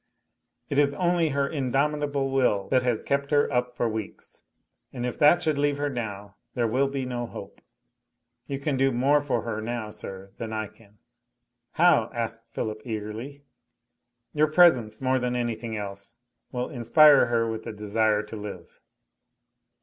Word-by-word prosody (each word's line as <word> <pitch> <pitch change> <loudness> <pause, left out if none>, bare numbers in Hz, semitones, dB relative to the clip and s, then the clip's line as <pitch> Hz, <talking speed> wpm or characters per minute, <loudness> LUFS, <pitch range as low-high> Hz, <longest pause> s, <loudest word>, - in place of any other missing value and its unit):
"It 140 - 0
is 140 -1 +3
only 175 -2 +1
her 140 0 0
indomitable 140 0 -1
will 115 -7 +1
that 130 -1 +3
has 125 -3 -1
kept 140 0 -1
her 145 -1 +3
up 125 0 0
for 120 - 0
weeks. 110 -2 -6 0.5
And 120 - -4
if 125 - -4
that 150 +4 +5
should 155 -3 0
leave 145 0 +1
her 145 0 -1
now, 105 -5 -6 0.2
there 120 - +1
will 130 +5 +1
be 135 -1 -3
no 120 -1 -3
hope. - - -10 0.9
You 140 - -3
can 140 0 -2
do 135 +1 +3
more 135 +4 +3
for 145 -2 -1
her 110 -2 -3
now, 115 -1 -4
sir, 95 -2 -9
than 110 -1 -5
I 110 -1 -3
can?" 105 -2 -23 0.8
"How?" 160 -9 +4
asked 115 0 -4
Philip 110 -1 -4
eagerly. 115 +5 -6 0.9
"Your 155 0 +3
presence, 135 -10 +4
more 130 0 +2
than 125 0 -1
anything 115 -2 -3
else, 100 +1 -7 0.4
will 125 +3 -3
inspire 140 +3 +6
her 115 -1 +1
with 110 -1 -4
the 115 - -4
desire 105 0 0
to 105 +1 -9
live." 100 -5 -9
125 Hz, 165 wpm, -26 LUFS, 110-140 Hz, 0.9 s, inspire